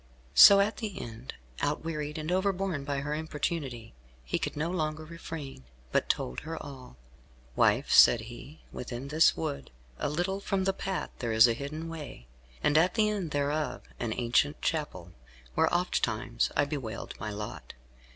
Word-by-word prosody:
So 200 - +10
at 210 +2 0
the 205 -4 -5
end, 115 +2 -8 0.3
outwearied 150 0 -2
and 155 +2 -3
overborne 190 -4 0
by 140 -1 -2
her 150 +1 -3
importunity, 150 - -3 0.3
he - - -1
could - - -3
no 160 +3 -1
longer 155 -3 -2
refrain, 160 - -8 0.3
but - - +1
told 60 - -1
her 165 +1 -6
all. 130 - -10 0.6
"Wife," - - +3
said 120 - +8
he, 120 +6 -11
"within 125 +2 -6
this 155 +2 +4
wood, 150 -3 -4 0.3
a - - 0
little 175 +6 -1
from 195 -1 -1
the 195 0 +1
path, 190 0 -3
there 120 -2 -2
is 110 +2 +7
a 115 - +2
hidden 150 +6 -5
way, 150 - -8 0.4
and 150 +1 +5
at 180 +3 +2
the 215 -2 +3
end 195 -6 -2
thereof 145 +1 -1 0.2
an 120 -2 -2
ancient 125 +5 +2
chapel, 150 - -3 0.4
where - - +2
oftentimes - - 0
I - - +4
have 145 - -1
bewailed 125 -7 -4
my 110 - -4
lot. 105 0 -7
150 Hz, 165 wpm, -29 LUFS, 125-165 Hz, 0.6 s, So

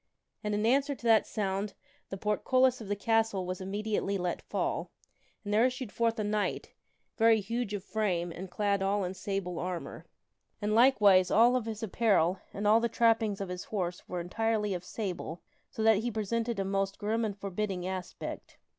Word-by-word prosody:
And 210 0 -1
in 210 +1 0
answer 275 +4 +2
to - - -19
that 225 -2 +5
sound, 200 0 -2 0.3
the 195 - -5
portcullis 255 +5 +2
of 215 - -8
the 205 - 0
castle 225 -2 +1
was 185 0 -4
immedi 205 +3 -4
ately 200 -1 0
let 180 -2 -2
fall, - - -2 0.6
and 205 - -2
there 220 +2 +5
issued 255 -3 -2
forth 230 0 0
a 215 - -1
knight, 210 0 -2 0.4
very 225 -1 +5
huge 220 +1 -3
of 195 - -5
frame, 185 -6 -1
and 180 +3 -7
clad 200 +1 0
all 195 +1 +1
in 180 0 -3
sable 190 -2 -3
armor. 180 -1 -5 0.5
And, 210 0 -1
likewise, 210 -6 +6
all 235 +6 +5
of 250 -3 0
his 220 0 -5
apparel 195 -5 +2
and 205 - -5
all 215 +2 +6
the 235 0 0
trappings 225 -3 +2
of 195 - -4
his 180 0 -5
horse 180 -4 -4
were 180 - -3
entirely 210 +3 0
of 180 -1 -4
sable, 180 -4 -5 0.3
so 225 -5 -4
that 220 -1 +6
he 230 +4 -1
presented 230 +1 -2
a 195 - 0
most 195 0 -1
grim 220 +2 -1
and 210 -2 -2
forbidding 195 -2 -3
aspect. 185 -1 -6
205 Hz, 190 wpm, -30 LUFS, 190-225 Hz, 0.6 s, likewise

